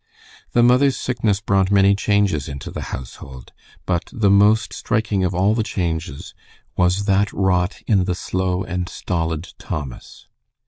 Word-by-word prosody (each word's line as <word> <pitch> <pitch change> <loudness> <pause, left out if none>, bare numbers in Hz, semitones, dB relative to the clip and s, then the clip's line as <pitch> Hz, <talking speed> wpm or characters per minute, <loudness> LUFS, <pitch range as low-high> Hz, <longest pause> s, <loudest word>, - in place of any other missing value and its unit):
The 120 - +4
mother's 130 +3 +4
sickness 110 -5 -1
brought 95 -2 +2
many 100 0 +5
changes 100 -8 +1
into 70 -1 -7
the - - -6
household, 65 0 -9 0.3
but 90 -2 -1
the 110 -6 +2
most 105 +3 +4
striking 105 -3 -1
of 90 0 -1
all 95 +4 +3
the 115 - 0
changes 85 -7 -4 0.4
was 90 +3 +1
that 100 0 +2
wrought 90 -2 0
in 95 -5 +2
the 90 -2 -1
slow 95 0 -2
and 90 0 -4
stolid 80 -1 -3
Thomas. 70 -5 -7
95 Hz, 145 wpm, -21 LUFS, 90-105 Hz, 0.4 s, many